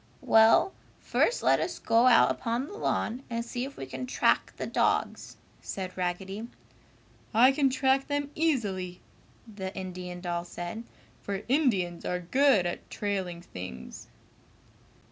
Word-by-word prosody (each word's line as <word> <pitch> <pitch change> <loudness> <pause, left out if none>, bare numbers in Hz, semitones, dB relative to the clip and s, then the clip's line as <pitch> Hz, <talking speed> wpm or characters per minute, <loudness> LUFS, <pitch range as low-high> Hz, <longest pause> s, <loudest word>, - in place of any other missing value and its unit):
"Well, 225 +11 +5 0.3
first 480 - +1
let - - +4
us - - -2
go 230 +2 +3
out 245 -2 +6
upon 235 +2 -2
the 355 - -10
lawn 255 - -1
and 230 0 -3
see 245 +1 -3
if 275 - -10
we - - -5
can 255 - -6
track - - +2
the - - -3
dogs!" - - 0 0.2
said 185 -1 -5
Raggedy. 190 +4 -3 0.9
"I 250 +4 +7
can 275 -1 +2
track 265 +1 +2
them 285 0 -2
easily!" 200 - -1 0.5
the 195 -3 -6
Indian 180 -1 -6
doll 175 -1 -3
said, 175 +6 -6 0.4
"for 200 0 -4
Indians 225 - +1
are 180 - -1
good 225 +2 +3
at 175 - -4
trailing 190 -4 -3
things!" 75 - -9
215 Hz, 140 wpm, -28 LUFS, 180-260 Hz, 0.9 s, I